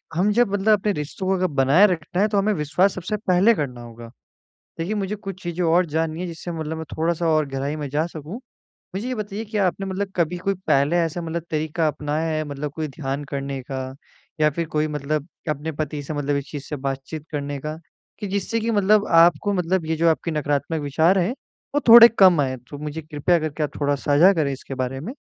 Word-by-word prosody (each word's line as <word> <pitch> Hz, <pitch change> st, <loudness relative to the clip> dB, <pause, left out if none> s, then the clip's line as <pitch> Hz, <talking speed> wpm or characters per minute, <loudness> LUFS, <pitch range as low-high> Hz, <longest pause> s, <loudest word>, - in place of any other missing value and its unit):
हम 195 Hz, +5 st, +2 dB
जब 240 Hz, -2 st, +3 dB
मतलब 205 Hz, +1 st, +3 dB
अपने 210 Hz, -, 0 dB
रिश्तों 150 Hz, +5 st, -5 dB
को 190 Hz, -, +3 dB
अगर 185 Hz, 0 st, +1 dB
बनाये 145 Hz, +5 st, +4 dB
रखना 175 Hz, 0 st, -2 dB
है 210 Hz, -, +4 dB
तो 210 Hz, -1 st, -1 dB
हमें 205 Hz, +2 st, +2 dB
विश्वास 175 Hz, +4 st, +1 dB
सबसे 185 Hz, +4 st, -3 dB
पहले 195 Hz, +2 st, +3 dB
करना 130 Hz, -, -4 dB
होगा। 115 Hz, 0 st, -10 dB, 0.7 s
देखिए 170 Hz, +6 st, -2 dB
मुझे 200 Hz, -1 st, -2 dB
कुछ 195 Hz, -2 st, -8 dB
चीज़ें 175 Hz, +1 st, -3 dB
और 170 Hz, +2 st, +3 dB
जाननी 160 Hz, +1 st, -2 dB
है 180 Hz, -, -3 dB
जिससे 170 Hz, 0 st, -6 dB
मतलब 160 Hz, -1 st, -4 dB
मैं 160 Hz, -, -5 dB
थोड़ा-सा 165 Hz, +1 st, 0 dB
और 155 Hz, -1 st, +2 dB
गहराई 135 Hz, +2 st, -3 dB
में 150 Hz, -2 st, -4 dB
जा 155 Hz, +4 st, 0 dB
सकूँ। 160 Hz, +1 st, -8 dB, 0.6 s
मुझे 205 Hz, +6 st, -3 dB
ये 255 Hz, -, -2 dB
बताइए 210 Hz, 0 st, -5 dB
कि 215 Hz, 0 st, -4 dB
आपने 195 Hz, 0 st, 0 dB
मतलब 190 Hz, +1 st, -3 dB
कभी 175 Hz, 0 st, 0 dB
कोई 195 Hz, +2 st, -1 dB
पहले 140 Hz, +5 st, +3 dB
ऐसा 170 Hz, 0 st, -1 dB
मतलब 165 Hz, 0 st, -4 dB
तरीका 155 Hz, +1 st, 0 dB
अपनाया 150 Hz, +2 st, -2 dB
है 155 Hz, -, -1 dB
मतलब 145 Hz, 0 st, -5 dB
कोई 155 Hz, -1 st, -2 dB
ध्यान 140 Hz, 0 st, -4 dB
करने 140 Hz, -1 st, -3 dB
का 130 Hz, -1 st, -2 dB, 0.6 s
या 150 Hz, -, +5 dB
फिर 165 Hz, +2 st, -3 dB
कोई 155 Hz, -1 st, 0 dB
मतलब 150 Hz, 0 st, -3 dB, 0.2 s
अपने 150 Hz, +2 st, -2 dB
पति 150 Hz, -1 st, -4 dB
से 150 Hz, -, -5 dB
मतलब 145 Hz, -1 st, -1 dB
इस 140 Hz, -1 st, -4 dB
चीज़ 145 Hz, -3 st, -6 dB
से 150 Hz, -, -3 dB
बातचीत 135 Hz, +2 st, -5 dB
करने 145 Hz, -1 st, -3 dB
का, 155 Hz, +3 st, -5 dB, 0.4 s
कि 205 Hz, -, -4 dB
जिससे 200 Hz, +4 st, -1 dB
की 230 Hz, +1 st, -1 dB
मतलब 210 Hz, 0 st, +3 dB
आपको 170 Hz, +5 st, +4 dB
मतलब 180 Hz, -2 st, 0 dB
ये 160 Hz, -, -1 dB
जो 165 Hz, +1 st, +3 dB
आपके 165 Hz, +1 st, -1 dB
नकारात्मक 145 Hz, +1 st, -1 dB
विचार 160 Hz, +7 st, +3 dB
हैं 180 Hz, +7 st, 0 dB, 0.4 s
वो 290 Hz, -, +4 dB
थोड़े 230 Hz, 0 st, +11 dB
कम 185 Hz, -5 st, +7 dB
आए 130 Hz, -2 st, -1 dB
तो 145 Hz, -, -7 dB
मुझे 150 Hz, +2 st, -5 dB
कृपया 155 Hz, +3 st, +1 dB
करके 155 Hz, 0 st, -3 dB
आप 150 Hz, -, -1 dB
थोड़ा 145 Hz, 0 st, +1 dB
साझा 145 Hz, +6 st, +4 dB
करे 155 Hz, -6 st, 0 dB
इसके 135 Hz, 0 st, -8 dB
बारे 130 Hz, 0 st, -3 dB
में? 205 Hz, -, -6 dB
160 Hz, 220 wpm, -23 LUFS, 145-185 Hz, 0.7 s, थोड़े